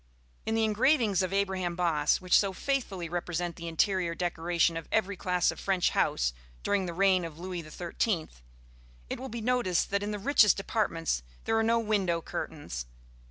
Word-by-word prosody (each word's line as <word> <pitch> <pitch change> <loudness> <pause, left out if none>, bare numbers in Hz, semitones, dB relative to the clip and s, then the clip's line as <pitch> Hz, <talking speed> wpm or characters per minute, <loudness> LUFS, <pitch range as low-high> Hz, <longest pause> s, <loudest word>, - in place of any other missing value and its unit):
In 220 - +1
the 225 - +2
engravings 220 - +3
of 185 -1 -1
Abraham 190 -3 0
Bosse, 160 -4 +2
which 180 -1 +2
so 195 -2 +3
faithfully 200 -8 -2
represent 175 0 -3
the 170 - -7
interior 170 +1 +1
decoration 170 -1 0
of 165 -1 -6
every 200 -2 +1
class 180 -1 +1
of - - -10
French 190 -2 +1
house - - +1 0.3
during 195 -2 +1
the 170 - -4
reign 190 -1 +3
of 165 -2 -7
Louis 180 0 -5
XIII, 170 +3 -2 0.8
it - - -3
will 265 - -6
be 230 +1 -5
noticed 230 -8 +1
that 200 0 +1
in 205 - -3
the 210 - -2
richest 210 -3 +4
apartments 170 - -1 0.2
there 225 - 0
are 225 - +3
no 230 +1 +3
window 205 -7 +1
curtains. 145 - -6
185 Hz, 175 wpm, -29 LUFS, 170-210 Hz, 0.8 s, richest